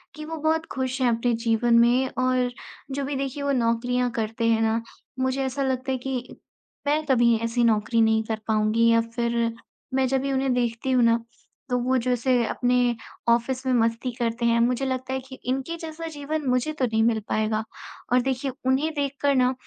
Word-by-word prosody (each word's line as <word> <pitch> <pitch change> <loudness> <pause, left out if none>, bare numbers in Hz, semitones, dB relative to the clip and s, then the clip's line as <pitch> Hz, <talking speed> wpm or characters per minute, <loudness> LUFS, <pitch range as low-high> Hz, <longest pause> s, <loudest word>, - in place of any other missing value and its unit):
कि 305 0 -7
वो 325 +1 -5
बहुत 320 +1 0
खुश 260 0 -2
हैं 250 - +4
अपने 235 +1 +1
जीवन 235 +1 +3
में। 245 +3 +4
और 255 -1 +1 0.4
जो 275 +1 -2
भी 285 +1 -3
देखिए, 275 +1 -3
वो 280 - +1
नौकरियाँ 245 0 +1
करते 225 0 -2
हैं 225 -1 +3
ना, 225 +1 +1 0.4
मुझे 260 +1 0
ऐसा 270 +1 -2
लगता 260 0 -1
है 260 - 0
कि 255 -1 -5 0.5
मैं 300 +2 +2
कभी 240 -4 +4
ऐसी 230 +1 0
नौकरी 225 0 +2
नहीं 220 0 +3
कर 220 0 -3
पाऊँगी, 220 +1 +3
या 230 0 +4
फिर, 235 0 -1 0.4
मैं 265 0 +2
जब 265 +1 +1
भी 275 0 -2
उन्हें 265 -1 +1
देखती 240 +1 -1
हूँ 250 -2 +4
ना, 230 0 +3 0.5
तो 250 - +1
वो 255 +2 +1
जो 255 - 0
ऐसे 245 0 +2
अपने 245 -1 +1 0.3
ऑफ़िस 250 +3 +1
में 260 - +2
मस्ती 230 +1 +1
करते 235 -1 -2
हैं, 235 0 +3
मुझे 250 +3 +1
लगता 260 0 -3
है 265 - -1
कि 260 0 -10
इनके 270 +6 -1
जैसा 325 0 -7
जीवन 295 +1 -3
मुझे 250 +4 +1
तो 290 -4 0
नहीं 220 -2 +1
मिल 225 -1 +2
पाएगा। 215 0 0 0.5
और 250 - +5
देखिए, 265 +1 -2
उन्हें 265 +4 +2
देख 285 -2 -1
कर 285 -1 +3
ना, 255 0 +3
250 Hz, 200 wpm, -25 LUFS, 230-265 Hz, 0.5 s, और